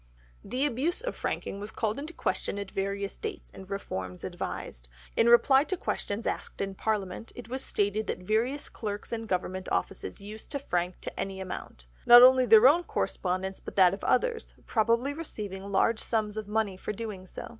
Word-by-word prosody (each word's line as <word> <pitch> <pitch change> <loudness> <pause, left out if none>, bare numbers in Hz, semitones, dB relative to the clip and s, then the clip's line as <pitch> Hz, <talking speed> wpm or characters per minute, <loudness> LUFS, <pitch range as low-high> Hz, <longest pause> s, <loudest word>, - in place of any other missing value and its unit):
The 255 +7 -1
abuse 295 - 0
of - - -4
franking 200 - -3
was 205 +1 -3
called 220 +2 -2
in 295 - -5
question 325 -9 -2
at 200 -1 -5
various 200 0 -3
dates, - - -6
and 190 0 -12
reforms 95 - -5
advised. - - -5 0.3
In 230 - +4
reply 265 +3 +6
to 375 - -2
questions 210 -8 -3
asked - - -3
in 195 0 -2
Parliament, 205 0 -2
it 240 -2 -9
was 260 +2 -2
stated 205 +1 0
that - - -1
various 225 +9 -1
clerks 210 0 -5
in 225 -1 -3
Government 185 -1 -2
offices - - -2
used 210 +2 -9
to - - 0
frank 180 -9 -2
to - - -7
any 195 -1 -3
amount—not 185 - +4
only 255 0 +7
their 220 +2 +9
own 335 +6 +5
correspondence 190 - -2
but - - -9
that 185 -2 +6
of 195 - -6
others; 485 -2 0
probably 235 +5 +2
receiving 200 - -6
large 220 +3 +3
sums 215 -2 -1
of 215 -2 -4
money 210 -3 0
for 200 - -4
doing 205 -4 -6
so. - - -7
215 Hz, 180 wpm, -29 LUFS, 195-240 Hz, 0.3 s, their